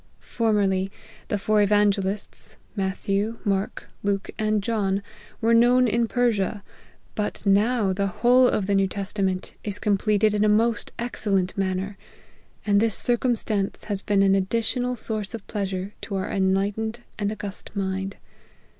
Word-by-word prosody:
Formerly, 200 -4 +1 0.4
the 205 - 0
four 210 +1 +2
evangelists, 205 -1 +1 0.2
Matthew, 200 +2 -1
Mark, 195 -1 -1
Luke, 200 -1 -1
and 215 -1 +1
John, 200 -3 0 0.4
were 230 +1 +3
known 245 +2 +5
in 230 +1 +1
Persia; 220 -4 0 0.5
but 210 0 -3
now 205 +1 +3
the 200 +1 0
whole 245 +6 +4
of 210 - +1
the 200 - 0
New 195 -1 +3
Testament 195 -1 -2
is 205 -1 -2
completed 210 0 +2
in 210 0 +2
a 215 - +4
most 225 +1 +2
ex 240 -1 -5
cellent 190 -2 +1
manner: 195 +1 -2 0.7
and 200 -1 +4
this 225 -1 +1
circumstance 230 -5 0
has 200 -3 -3
been 200 -1 +2
an 195 0 +4
additional 230 +6 0
source 220 -1 -4
of 220 - -9
pleasure 195 -1 -3
to 200 - -4
our 190 - -2
enlighten 195 +3 +1
ed - - -14 0.2
and 205 0 0
august 205 -2 -5
mind. 195 0 -2
205 Hz, 145 wpm, -25 LUFS, 195-220 Hz, 0.7 s, known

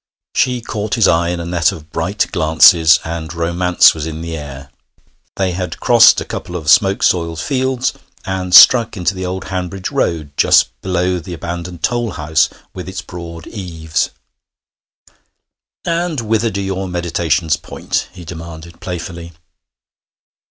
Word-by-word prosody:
She 125 -1 +1
caught 105 -2 -3
his 115 - +3
eye 85 +1 +2
in 90 0 -3
a 85 - -5
net 85 -2 +1
of 80 -1 -11
bright 95 +6 -1
glances, 80 -2 +5
and 80 -1 -5
romance 85 +1 +3
was 80 -1 -5
in 80 0 -6
the 85 0 -5
air. 70 -2 -9 0.6
They 95 -2 0
had 90 -3 -5
crossed 120 -2 +6
a - - -5
couple 90 - -6
of 80 -3 +1
smoke 100 -1 +3
soiled 85 -2 +1
fields, 130 - -1 0.3
and 95 -1 -3
struck 115 -1 +7
into 90 0 0
the 95 -1 -5
old 95 +1 -5
Hanbridge 95 0 -4
road 75 -4 -1
just - - +4
below 90 0 -1
the 85 +1 -8
abandoned 85 +1 -6
toll 120 -4 -1
house 80 0 +1 0.2
with - - -7
its - - -6
broad 85 -1 -9
eaves. 80 -6 -3 1.8
'And 170 -3 -1
whither 115 0 0
do 100 -2 -4
your 95 0 -3
meditations 85 -2 0
point?' - - -4
he 90 -1 -12
demanded 85 0 -10
playfully. 85 -1 -7
85 Hz, 150 wpm, -16 LUFS, 80-95 Hz, 1.8 s, struck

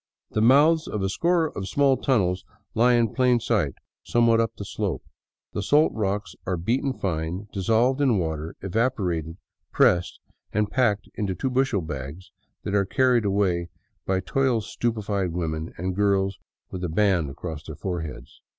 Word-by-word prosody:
The 110 - 0
mouths 150 +7 +5
of 105 -2 -3
a 95 - 0
score 170 - +1
of 95 - -4
small 140 +1 +3
tunnels 95 -10 +1 0.3
lie 120 +2 +4
in 115 -3 +2
plain 125 -2 +3
sight 100 - 0 0.3
somewhat 115 -1 +3
up 115 -1 0
the 100 - -6
slope. - - -3 0.5
The - - -2
salt 145 +10 +3
rocks 105 -1 -2
are 90 -1 0
beaten 120 +10 0
fine, 90 -2 -3
dissolved 115 +8 +2
in 130 -6 +3
water, 80 -2 -3
evaporated, 95 - -1 0.3
pressed, 90 0 +2 0.3
and 105 0 0
packed 115 -6 +1
into 100 -3 -2
two 130 +9 -2
bushel 125 -6 +1
bags 75 +3 -7 0.3
that 100 - -3
are 100 -1 +3
carried 125 +2 +2
away 95 -4 +1 0.4
by 95 0 +1
toil 130 +2 +1
stupefied 105 -6 -2
women 80 -2 -3
and 95 +1 -3
girls 100 -1 +1 0.3
with 90 -1 -5
a 90 - -1
band 90 -3 +2
across 75 +2 -6
their 80 - -8
foreheads. 80 -6 -6
100 Hz, 160 wpm, -25 LUFS, 90-120 Hz, 0.5 s, mouths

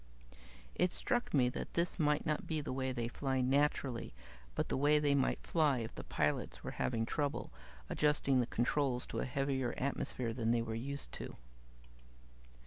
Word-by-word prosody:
"It 180 0 +2
struck 245 0 -1
me 130 -4 +4
that - - -5
this 170 +1 0
might 150 -1 +2
not 150 -1 -1
be 160 -1 0
the 145 -3 -3
way 130 0 -1
they 120 -2 -2
fly, 130 +2 -1
naturally, 130 - +1 0.4
but - - 0
the - - -1
way 145 +3 +4
they 145 -1 +3
might 140 -2 +1
fly 150 -5 +3
if 115 -2 -4
the - - -7
pilots 75 -1 -1
were - - -4
having 115 -2 +1
trouble 145 +3 -2 0.4
adjusting 150 -3 +2
the 120 - +1
controls 125 +1 +1
to - - -4
a - - 0
heavier 130 -1 -1
atmosphere 125 -3 -1
than 115 -1 -1
they 120 0 +3
were 115 - -4
used 130 - -4
to." - - -6
135 Hz, 175 wpm, -35 LUFS, 120-145 Hz, 0.4 s, me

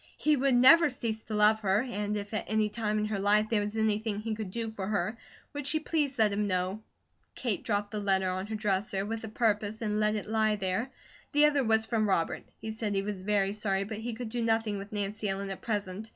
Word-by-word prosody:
He 305 0 +3
would 270 -1 +2
never 290 +6 +7
cease 230 -4 -4
to 215 - -4
love 210 +1 +5
her, 200 +1 +2
and 210 -3 -2
if 205 +1 -6
at 215 - -1
any 215 0 +2
time 215 -1 -1
in 210 - 0
her 215 -2 -2
life 210 +2 +3
there 215 -2 +3
was 210 +2 -4
anything 215 -1 0
he 220 +1 -3
could 215 -3 -5
do 225 +4 -3
for 205 -4 -5
her, 215 +1 -1 0.4
would 290 -1 -4
she 315 - +2
please 295 -4 -1
let 215 -3 +3
him 205 +1 0
know. 185 +2 -1 0.5
Kate 230 -7 -2
dropped 205 -2 -1
the 210 - -3
letter 190 -2 +1
on 185 +2 -2
her 220 - -4
dresser, 195 -2 -1
with 225 +1 -4
a - - -7
purpose, 215 -1 0
and 210 -2 -1
let 215 0 +2
it 210 - -3
lie 220 -1 +1
there. 195 +5 -2 0.4
The 295 +1 +6
other 290 -2 +3
was 220 -1 +3
from 220 -2 0
Robert. 165 -4 0 0.2
He 220 - -5
said 220 -2 -3
he 195 - +1
was 200 -2 -4
very 200 0 +1
sorry, 195 -2 0
but 215 +1 -6
he 235 +1 -4
could 235 -1 -5
do 240 +1 -2
nothing 225 -2 +1
with 200 +1 -9
Nancy 205 0 -2
Ellen 195 0 -3
at 190 - -7
present. 205 -1 -3
215 Hz, 240 wpm, -30 LUFS, 205-225 Hz, 0.5 s, never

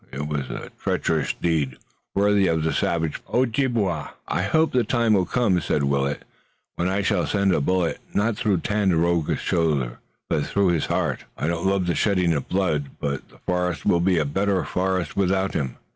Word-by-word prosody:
It 70 +2 -4
was 70 -4 -3
a - - -6
treacherous - - 0
deed, 75 -7 -1 0.4
worthy 100 -1 +3
of 80 -1 +1
the 80 - 0
savage 80 -2 -1
Ojibway." 115 - +1 0.2
"I - - 0
hope 160 - +2
the 125 -1 +3
time 115 0 +2
will 95 -3 +2
come," 105 -8 +2
said 75 - 0
Willet, 70 0 0 0.5
"when 85 - 0
I 95 +2 0
shall 95 -3 +1
send 100 -2 +2
a 75 - +1
bullet 90 +2 0
not 110 +2 +1
through 100 -5 0
Tandakora's 85 -6 +1
shoulder, 75 -8 0 0.3
but 75 - 0
through 100 -2 +2
his 85 -4 +1
heart. - - -1
I - - -2
don't 85 +3 0
love 95 -1 +1
the 90 - +1
shedding 90 -5 +2
of 70 -4 -3
blood, 80 -7 0
but 70 -1 -3
the - - -19
forest 90 -3 -1
will 85 - +4
be 90 +1 +2
a 80 - +2
better 95 +6 0
forest 95 -3 -1
without 95 0 +1
him. 65 -5 -2
90 Hz, 185 wpm, -24 LUFS, 80-100 Hz, 0.5 s, will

